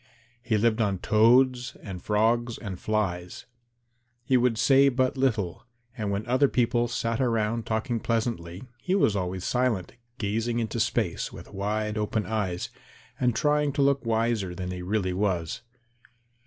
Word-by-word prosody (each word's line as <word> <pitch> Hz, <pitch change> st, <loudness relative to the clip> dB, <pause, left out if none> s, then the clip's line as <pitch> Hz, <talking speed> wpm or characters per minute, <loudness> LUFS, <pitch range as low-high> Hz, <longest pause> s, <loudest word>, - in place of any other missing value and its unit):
He 115 Hz, -3 st, 0 dB
lived 115 Hz, +1 st, +2 dB
on 100 Hz, -3 st, +1 dB
toads 125 Hz, +5 st, +3 dB
and 95 Hz, -4 st, -7 dB
frogs 115 Hz, +2 st, +1 dB
and 95 Hz, -5 st, -6 dB
flies. 90 Hz, -5 st, -2 dB, 0.8 s
He 130 Hz, -, +2 dB
would 125 Hz, -2 st, +3 dB
say 135 Hz, +3 st, +5 dB
but 130 Hz, 0 st, +1 dB
little, 110 Hz, -10 st, 0 dB, 0.3 s
and 105 Hz, -4 st, -3 dB
when 100 Hz, +1 st, -2 dB
other 130 Hz, +4 st, +3 dB
people 120 Hz, -1 st, +1 dB
sat 115 Hz, 0 st, -1 dB
around 115 Hz, -3 st, +1 dB
him -, -, -6 dB
talking 115 Hz, +2 st, -1 dB
pleasantly, 110 Hz, -6 st, -2 dB, 0.2 s
he 185 Hz, -, 0 dB
was 115 Hz, -, +3 dB
always 90 Hz, -1 st, -2 dB
silent, 125 Hz, -7 st, 0 dB, 0.2 s
gazing 115 Hz, +2 st, -1 dB
into 115 Hz, -2 st, -2 dB
space -, -, 0 dB
with -, -, -12 dB
wide 105 Hz, +2 st, -2 dB
open 105 Hz, 0 st, -1 dB
eyes, 100 Hz, -5 st, -2 dB, 0.5 s
and 125 Hz, -3 st, +2 dB
trying 150 Hz, -1 st, +2 dB
to 140 Hz, 0 st, +2 dB
look 140 Hz, 0 st, +2 dB
wiser 110 Hz, -5 st, 0 dB
than 90 Hz, 0 st, -4 dB
he 90 Hz, -1 st, -5 dB
really 95 Hz, 0 st, -1 dB
was. 90 Hz, -4 st, -1 dB
110 Hz, 155 wpm, -27 LUFS, 100-125 Hz, 0.8 s, say